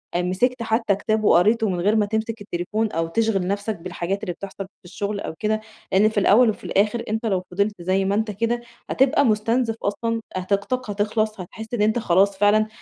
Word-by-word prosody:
آآ، 175 - +2
مسَكت 230 +8 0
حتى 220 -2 +1
كتاب 215 +2 -1
وقريته 215 +4 +4
من 180 -2 -1
غير 205 +5 +2
ما 210 -2 +3
تمسك 220 +1 -3
التليفون 210 +3 -2
أو 165 0 -1
تشغَل 195 0 0
نفسَك 205 +1 -2
بالحاجات 185 +3 -4
اللي 180 -4 -2
بتحصل 195 +2 -7
في 190 - -26
الشغل 200 +3 -4
أو - - -5
كده. 215 0 0 0.3
لإن 205 +3 +4
في 220 - 0
الأوَّل 220 +4 +5
وفي 215 - -4
الآخِر، 210 +4 +1
أنتَ 220 +2 -2
لو 190 -4 0
فِضِلت 200 0 -1
زي 190 +2 +1
ما 200 +1 +1
أنتَ 220 0 0
كده، 230 +4 -1 0.3
هتبقى 280 +2 +3
مُستنزَف 225 +1 +1
أصلًا، 230 +3 -1
هت 185 +2 -1
طاقتَك 250 +4 -1
هتخلَص، 215 +1 -1
هتحس 220 +5 -9
إن 230 - 0
أنتَ 220 +3 +2
خلاص 195 0 +2
فعلًا 210 +2 +4
210 Hz, 200 wpm, -23 LUFS, 195-220 Hz, 0.3 s, الأوَّل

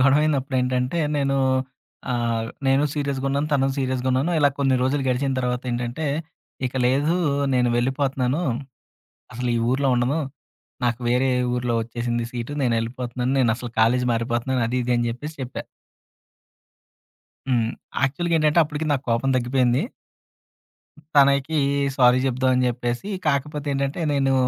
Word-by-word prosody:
గొడవ 140 +2 +5
అయినప్పుడేంటంటే 130 -1 0 0.2
నేనూ 135 -1 +1 0.8
ఆహ్, 115 -2 -1 0.2
నేను 135 +2 +3
సీరియస్‌గున్నాను, 140 0 -1
తను 135 -2 +3
సీరియస్‌గున్నాను. 130 +3 0
ఇలా 145 -1 +5
కొన్ని 135 -2 +2
రోజులు 135 +2 +1
గడిచిన 135 +2 0
తర్వాతేంటంటే, 125 +3 -2 0.6
ఇక 125 - -7
లేదూ 145 +7 +2 0.4
నేను 125 -1 +3
వెళ్ళిపోతున్నాను, 130 +2 0 0.9
అసలు 125 +1 -2
ఈ - - +2
ఊరులో 135 +2 +1
ఉండను, 125 +6 +1 0.7
నాకు 120 0 0
వేరే 125 +2 +2 0.2
ఊరులో 125 -1 0
ఒచ్చేసింది 120 0 -3
సీటు, 120 +1 -5
నేనెళ్ళిపోతన్నాను. 125 +1 -1
నేనసలు 120 -1 0
కాలేజ్ 125 +3 +3
మారిపోతన్నాను. 120 +2 -1
అది 125 - -1
ఇది 125 - -1
అని 120 0 0
చెప్పేసి 150 +6 -7
చెప్పా. 125 - -6 1.9
హ్మ్. 115 -3 +2 0.3
యాక్చువల్‌గేంటంటే 155 +2 +2
అప్పుడుకి 150 +1 -4
నాకు 135 - -1
కోపం 115 +4 +1
తగ్గి‌పోయింది 125 +1 +2 1.3
తనకి 140 +2 +4 0.4
సారీ 125 -1 +5
చెప్దామని 130 0 +2
చెప్పేసి, 120 - -3 0.2
కాకపోతే 145 +1 -1
ఏంటంటే 140 +4 -2
నేను 135 -1 +2
130 Hz, 120 wpm, -23 LUFS, 120-140 Hz, 1.9 s, గొడవ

